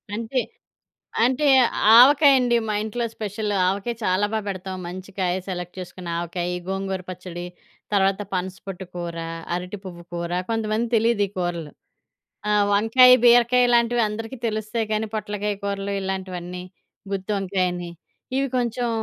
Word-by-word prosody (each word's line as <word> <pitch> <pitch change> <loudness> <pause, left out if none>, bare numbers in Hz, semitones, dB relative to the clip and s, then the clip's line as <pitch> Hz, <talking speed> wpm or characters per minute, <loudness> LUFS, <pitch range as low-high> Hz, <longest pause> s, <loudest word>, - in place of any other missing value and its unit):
అంతే. 230 +3 -1 0.8
అంటే, 260 +4 +2 0.5
ఆవకాయండి 265 -2 +6
మా 215 - 0
ఇంట్లో 225 +2 -3
స్పెషల్. 210 0 -4 0.2
ఆవకాయ 200 +5 -2
చాలా 185 +3 +2
బా 220 - +1
పెడతాం. 190 -1 -4
మంచి 185 +2 -8
కాయ 180 -2 +1
సెలెక్ట్ 180 -1 -5
చేసుకొని 180 -1 -8
ఆవకాయి, 175 +1 -3
గోంగూర 195 -1 -3
పచ్చడి, 180 -1 -7 0.5
తర్వాత 195 0 +2
పనసపొట్టు 185 +1 -5
కూర, 170 -1 -5 0.4
అరటి 180 +3 -4
పువ్వు 175 -2 -9
కూర, 170 0 -3 0.2
కొంతమంది 225 0 0
తెలీదీ 225 -2 +2
కూరలు. 175 -4 -3 0.8
ఆ! - - +2 0.2
వంకాయి, 240 +5 +7
బీరకాయిలాంటివి 240 0 +5
అందరికీ 225 +4 -6
తెలుస్తాయి, 215 0 -2
కానీ 215 0 -1
పొట్లకాయ 210 -1 -3
కూరలు 200 0 -2
ఇలాంటివన్నీ, 180 -2 -5 0.5
గుత్తి 195 +2 -3
వంకాయని, 180 -2 -2 0.5
ఇవి 275 - +1
కొంచుం 240 0 -1
200 Hz, 125 wpm, -23 LUFS, 185-230 Hz, 0.8 s, వంకాయి